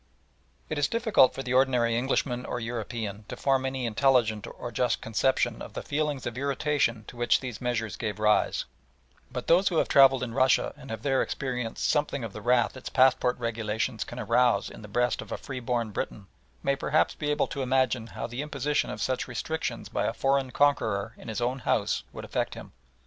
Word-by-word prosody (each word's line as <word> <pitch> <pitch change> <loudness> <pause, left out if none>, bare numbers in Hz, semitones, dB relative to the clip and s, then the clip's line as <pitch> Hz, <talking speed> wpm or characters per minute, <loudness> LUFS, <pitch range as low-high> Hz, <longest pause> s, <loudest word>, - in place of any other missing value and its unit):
It - - -2
is 145 - +3
difficult 225 - +4
for 135 - -4
the 130 0 -2
ordinary 125 -3 +3
Englishman 125 0 0
or 125 - -3
European 115 -3 -4
to - - -6
form 135 -1 +1
any 130 -1 -3
intelligent 115 -2 +2
or 120 - -7
just 125 0 +1
conception 120 +1 0
of - - -8
the - - -5
feelings 145 -2 -2
of 120 +1 -4
irritation 140 -5 0
to - - -11
which 120 0 +3
these 125 -5 -6
measures 120 -3 -2
gave 110 -2 -3
rise, 105 0 +2 0.7
but - - -4
those 180 +4 +4
who 170 - +1
have - - +3
travelled 135 -2 +6
in 120 -2 -4
Russia 130 0 +3
and 135 - -13
have 110 -1 -5
there 135 -2 +2
experienced 125 -4 -2
something 145 -3 0
of 110 -3 -5
the 105 - -7
wrath 120 +2 +2
its 130 - -7
passport 130 -1 +3
regulations 110 0 -2
can - - -9
arouse 120 +3 +2
in - - -11
the 105 - -9
breast 120 +4 0
of - - -11
a - - -2
freeborn 125 -4 -3
Briton, 100 0 -4 0.4
may 140 - +2
perhaps 145 +3 +1
be 150 - -3
able 150 0 +2
to 140 - -5
imagine 130 -3 +1
how 110 +2 -5
the 120 +3 -4
imposition 145 0 -1
of - - -4
such 130 -1 -1
restrictions 160 +6 -3
by - - -1
a - - -1
foreign 135 -1 +1
conqueror 115 -6 +1
in - - -13
his 110 +1 -3
own 125 +3 0
house - - 0
would - - -8
affect - - -2
him. - - -10
125 Hz, 200 wpm, -28 LUFS, 115-135 Hz, 0.7 s, travelled